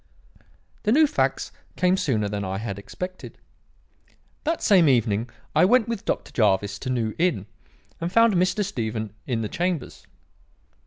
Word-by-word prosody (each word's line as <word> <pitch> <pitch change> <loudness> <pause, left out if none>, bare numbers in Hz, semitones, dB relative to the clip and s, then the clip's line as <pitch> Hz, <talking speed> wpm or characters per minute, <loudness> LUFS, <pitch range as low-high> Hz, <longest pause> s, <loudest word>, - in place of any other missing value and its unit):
"The 210 - +1
new 310 +6 +6
facts 295 0 -1 0.2
came 180 0 +3
sooner 130 - 0
than 100 0 -3
I 95 0 -3
had 100 -2 -5
expected. 180 - -8 1.1
That 325 +2 -1
same 180 -7 +5
evening 115 -2 +1 0.3
I 155 - +5
went 230 +4 +4
with 230 -4 -4
Dr. - - -2
Jervis 100 -2 +1
to 130 - -5
New 115 -4 -1
Inn 160 - +1 0.5
and 170 +1 -3
found 230 +1 +5
Mr. 185 +3 +1
Stephen 110 - -4
in 120 -3 -1
the - - -2
chambers. 175 - -3
135 Hz, 150 wpm, -24 LUFS, -, 1.1 s, new